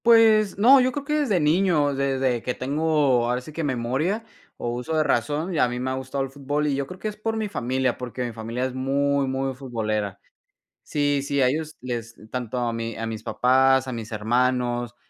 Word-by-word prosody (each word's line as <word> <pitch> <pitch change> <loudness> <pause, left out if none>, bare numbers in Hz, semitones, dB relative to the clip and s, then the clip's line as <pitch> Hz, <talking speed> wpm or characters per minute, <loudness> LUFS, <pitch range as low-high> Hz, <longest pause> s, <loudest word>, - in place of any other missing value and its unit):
Pues, 220 -4 +5
no, 255 +7 +7
yo 255 +1 +2
creo 285 +2 -5
que 300 - -2
desde 225 -11 +2
niño, 155 -2 +3
desde 135 -3 0
que 125 - -3
tengo 140 -3 +1
ahora 125 +1 +1
sí 140 +5 -11
que 165 - -3
memoria, 140 - -1 0.3
o, 120 - -3
uso 125 +7 -3
de 155 - +4
razón, 150 +7 0
a - - +4
mí 125 0 -4
me 130 +1 -2
ha - - -1
gustado 130 +1 -3
el 135 - -6
fútbol, 145 +2 -2
y 145 - +1
yo 135 0 -2
creo 180 - -9
que - - -3
es 210 - -4
por 225 +1 -2
mi 215 -1 -2
familia, 130 - -1
porque 125 0 -4
mi 120 - -5
familia 115 +3 -3
es 130 - -3
muy, 140 +1 +1
muy 135 0 -1
futbolera. 110 -6 -3 0.6
Sí, 145 -1 0
sí, 140 0 0
a 130 - +5
ellos 155 +3 -2
les 120 -2 -5 0.2
tanto 125 -1 -3
a 120 -1 0
mi 115 0 -4
a 115 - -3
mis 110 -1 -5
papás, 130 +1 +3
a - - -3
mis 115 -2 -6
hermanos, 120 +2 0
130 Hz, 215 wpm, -24 LUFS, 120-150 Hz, 0.6 s, no